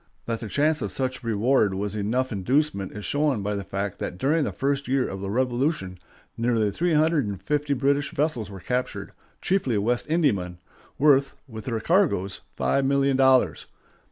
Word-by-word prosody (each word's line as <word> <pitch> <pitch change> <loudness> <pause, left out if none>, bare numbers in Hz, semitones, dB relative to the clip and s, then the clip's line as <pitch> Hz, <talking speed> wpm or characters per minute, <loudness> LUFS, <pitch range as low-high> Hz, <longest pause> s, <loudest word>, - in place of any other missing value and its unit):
That 115 -1 -2
the 110 - -6
chance 150 +4 +1
of - - -3
such 130 -1 -2
reward 110 -2 +2
was 105 +2 -3
enough 120 +6 -1
inducement 110 0 0
is 105 -1 -7
shown 145 -7 0
by 105 +1 -1
the 100 -1 -3
fact 100 0 -4
that 90 - -4
during 150 - +1
the - - -2
first 140 +1 -1
year 130 0 +1
of 95 0 -6
the 100 - -4
Revolution 125 - -1 0.4
nearly 115 -3 +1
three 170 - 0
hundred 155 -5 +2
and 100 -2 -4
fifty 145 +7 -1
British 140 +2 +1
vessels 140 -8 -1
were 100 -1 -9
captured, 125 +7 -3 0.3
chiefly 175 - +1
West 120 +4 0
Indiamen, 105 - +1 0.4
worth, 140 -1 +4
with 110 -4 -9
their 115 -3 -2
cargoes, 135 - +1
five 65 - +1
million 140 0 +2
dollars. 130 - +3
125 Hz, 175 wpm, -25 LUFS, 100-140 Hz, 0.4 s, worth